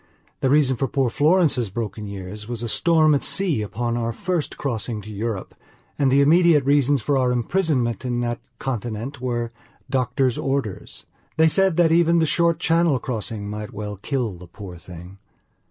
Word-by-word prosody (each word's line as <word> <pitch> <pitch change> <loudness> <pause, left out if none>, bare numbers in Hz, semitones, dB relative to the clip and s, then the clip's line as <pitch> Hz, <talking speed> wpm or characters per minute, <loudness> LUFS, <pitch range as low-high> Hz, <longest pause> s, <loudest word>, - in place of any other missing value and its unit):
The 135 - +1
reason 135 -3 +3
for 135 - 0
poor 130 -1 0
Florence's 150 - +2
broken 105 0 -5
years 100 +2 -7
was 120 -1 -4
a - - -2
storm 155 +4 +3
at 140 - +1
sea 175 - +1
upon 120 +3 -3
our 115 -1 -1
first 170 +6 -3
crossing 115 -4 -3
to 110 - -9
Europe, 105 -1 -4 0.5
and 135 -2 +3
the 140 +1 +5
immediate 160 -1 +5
reasons 140 -2 +3
for 140 +1 +1
our 125 -1 +2
imprisonment 125 -2 0
in 120 -1 -1
that 120 -1 -2 0.2
continent 120 +2 -4
were 120 -2 -2 0.4
doctor's 130 -1 0
orders. 135 -7 -3 0.3
They 160 0 +5
said 190 +1 +2
that 170 -2 +4
even 170 0 +4
the 165 - +3
short 170 +1 +2
Channel 165 -3 +2
crossing 110 -4 -4
might 105 0 -6
well 105 0 -5
kill 115 -4 -3
the 90 - -12
poor 90 0 -10
thing. 90 +2 -12
125 Hz, 170 wpm, -22 LUFS, 110-150 Hz, 0.5 s, the